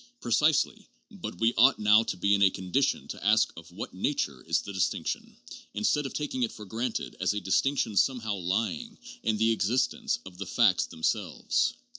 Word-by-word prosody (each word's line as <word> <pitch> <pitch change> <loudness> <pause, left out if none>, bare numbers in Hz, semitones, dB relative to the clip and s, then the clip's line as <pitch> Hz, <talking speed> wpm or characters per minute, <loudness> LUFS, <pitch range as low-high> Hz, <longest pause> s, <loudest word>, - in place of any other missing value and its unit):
Precisely; 150 - +1 0.2
but 200 -5 -7
we 115 +1 +3
ought 130 +2 +6
now 105 +1 +5
to 115 - -4
be 100 +3 +2
in 100 - +2
a 95 - +7
condition 95 +10 -1
to - - -8
ask 105 +2 +3
of 85 +1 -12
what 90 - -7
nature 85 - -2
is - - +2
the 100 - -8
distinction, 95 -3 -2 0.4
instead 135 +7 +1
of - - -9
taking 145 -3 -3
it 120 - +1
for 105 - -10
granted 115 +4 -3
as - - +1
a - - 0
dis 95 - +2
tinction 135 -6 -1
somehow 110 0 +1
lying 95 -1 -2 0.2
in 110 -1 0
the 110 +2 +3
existence 120 +4 0
of 90 -1 -12
the 100 - -5
facts - - +3
themselves. 100 - -1
110 Hz, 185 wpm, -28 LUFS, 95-125 Hz, 0.4 s, a